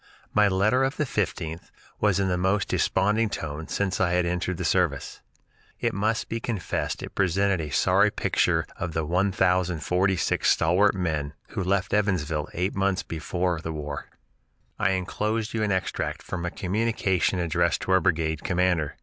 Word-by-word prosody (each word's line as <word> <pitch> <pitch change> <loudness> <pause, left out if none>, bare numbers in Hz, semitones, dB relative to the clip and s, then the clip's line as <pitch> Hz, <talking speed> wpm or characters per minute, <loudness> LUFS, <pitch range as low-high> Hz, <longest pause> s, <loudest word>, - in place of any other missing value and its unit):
My 105 -1 +5
letter 105 +7 +2
of 135 +1 -1
the - - +1
15th 90 - -3 0.3
was 105 -3 +2
in 100 - +1
the 90 - +1
most 95 +3 +1
desponding 105 +2 +2
tone 80 -3 -5
since 100 -2 -1
I 90 -2 +2
had 90 0 +2
entered 90 +1 -1
the - - -3
service. - - 0 0.6
It - - 0
must 110 +4 0
be 115 - -3
confessed 110 -6 -3
it - - -7
presented 95 0 +1
a 75 - -5
sorry - - +3
picture - - +1
of 85 -2 -4
the 80 -1 -1
1046 90 0 +1
stalwart 95 +5 +3
men 80 -6 -2
who - - -3
left 95 +1 0
Evansville 85 -8 0
eight 90 +4 0
months 95 -1 +1
before 85 +2 -2
for - - -10
the 80 - -4
war: 75 -2 -5 0.7
"I 95 - +2
enclose 105 +4 -2
you 115 - -1
an 105 -1 +1
extract 95 -1 -2
from 90 -2 -4
a - - -1
communication 95 -2 0
addressed 85 -3 +1
to - - -2
our 95 0 +5
brigade 80 -4 0
commander. 90 -5 +1
95 Hz, 165 wpm, -26 LUFS, 85-100 Hz, 0.7 s, My